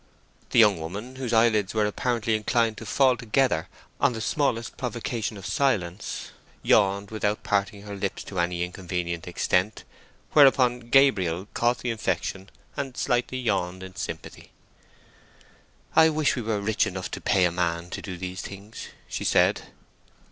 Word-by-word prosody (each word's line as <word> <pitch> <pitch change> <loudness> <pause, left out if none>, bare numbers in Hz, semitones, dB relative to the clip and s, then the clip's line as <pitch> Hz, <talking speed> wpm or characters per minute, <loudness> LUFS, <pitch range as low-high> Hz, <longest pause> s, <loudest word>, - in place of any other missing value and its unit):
The - - -1
young 105 -6 +6
woman, 105 +11 -7
whose 130 -3 -3
eyelids 115 -3 +3
were 105 -1 +3
apparently 115 +1 -1
inclined 115 +1 +1
to - - -8
fall 130 -2 +4
together 115 - +1 0.3
on 140 -3 +3
the 110 - -5
smallest 115 -1 -1
provocation 120 -3 -3
of 95 - -10
silence, 100 - -1 0.3
yawned 100 -1 +3
without 105 -1 -1
parting 100 0 -1
her 105 -1 -7
lips 100 0 -3
to 95 - -5
any 85 0 0
inconvenient 90 -2 -4
extent, 90 +3 0 0.5
whereupon 125 -4 +4
Gabriel 95 -10 +3
caught 120 +1 +2
the 120 - -3
infection 100 -3 -3 0.3
and 135 -3 -4
slightly 125 0 0
yawned 95 -6 -1
in 95 0 -10
sympathy. - - -7 1.5
"I 160 0 +7
wish 155 -1 +1
we 125 - -3
were 110 -2 -1
rich 105 +1 +1
enough 95 0 -5
to - - -5
pay 95 -2 +3
a 90 - +2
man 85 0 -2
to - - -5
do 90 -3 -6
these 90 +2 -5
things," 100 +3 -9 0.2
she - - -4
said. - - +3
105 Hz, 155 wpm, -26 LUFS, 95-120 Hz, 1.5 s, I